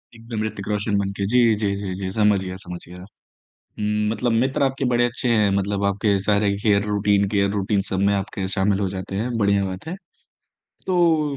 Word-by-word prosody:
एकदम 115 -1 -5
ऋतिक 105 -2 -5
रोशन 105 0 0
बन 100 -1 -1
के, 100 - -1
जी, 125 +5 +3 0.2
जी, 100 -2 -1
जी, 100 -2 -4
जी। 95 -1 -4
समझ 105 -1 +3
गया 90 0 -5
समझ 90 0 -7
गया। 90 +1 -11 0.6
हुँ, 105 0 -3
मतलब 115 +2 0
मित्र 130 +5 +1
आपके 135 0 0
बड़े 120 0 +3
अच्छे 120 +1 -2
हैं, 105 -3 +3
मतलब 100 0 -1
आपके 100 0 +1
सारे 100 +1 +2
केयर 100 -2 +3
रूटीन 100 -1 +2
केयर 100 -1 +1
रूटीन, 100 0 0
सब 95 - -1
में 100 - +3
आपके 95 -1 -3
शामिल 100 0 +1
हो 100 -2 0
जाते 95 0 -6
हैं, 110 +5 -1
बढ़िया 100 -2 +2
बात 95 +8 -6
है। 175 - -4 0.9
तो 165 -5 +2
105 Hz, 200 wpm, -22 LUFS, 100-115 Hz, 0.9 s, जी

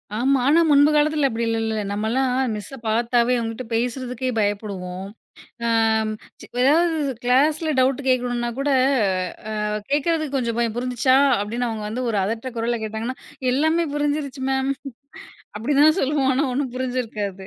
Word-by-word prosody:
ஆமா. 265 +3 +2
ஆனா, 315 +4 +5
முன்புகாலத்துல 295 0 +4
அப்படி 230 0 -2
இல்லல்ல. 225 -1 -1
நம்மள்லாம் 225 +6 0 0.3
மிஸ்ஸ 210 +6 -7
பாத்தாவே 235 +2 +2
அவங்ககிட்ட 225 +2 -4
பேசுறதுக்கே 250 +2 -2
பயப்படுவோம். 195 -3 -3 0.6
அம் 220 -1 +2 0.5
ஏதாவது 325 +4 +3 0.3
கிளாஸ்ல 300 +5 +2
டவுட் 260 +1 +2
கேக்கணும்னா 245 -1 0
கூட, 280 +1 0 0.8
அ - - -3 0.4
கேக்குறதுக்கு 300 -1 0
கொஞ்சம் 235 -3 -1
பயம். 230 -2 0
புரிஞ்சிச்சா? 255 +1 +2 0.2
அப்டின்னு 235 +4 -2
அவங்க 220 -2 -4
வந்து 250 +4 -3
ஒரு 210 - 0
அதட்டுற 230 +4 -4
குரல்ல 235 +1 -1
கேட்டாங்கன்னா, 220 +4 -4 0.4
எல்லாமே 315 +5 +2
புரிஞ்சிடுச்சு 290 -2 -2
மேம். 265 +1 +1 0.8
அப்படி 235 +7 -1
தான் 310 +4 +5
சொல்லுவோம். 275 -1 +1
ஆனா 285 +3 +1
ஒண்ணும் 260 -1 -2
புரிஞ்சு 255 0 -1
இருக்காது. 200 -3 -5
250 Hz, 135 wpm, -22 LUFS, 225-280 Hz, 0.8 s, ஆனா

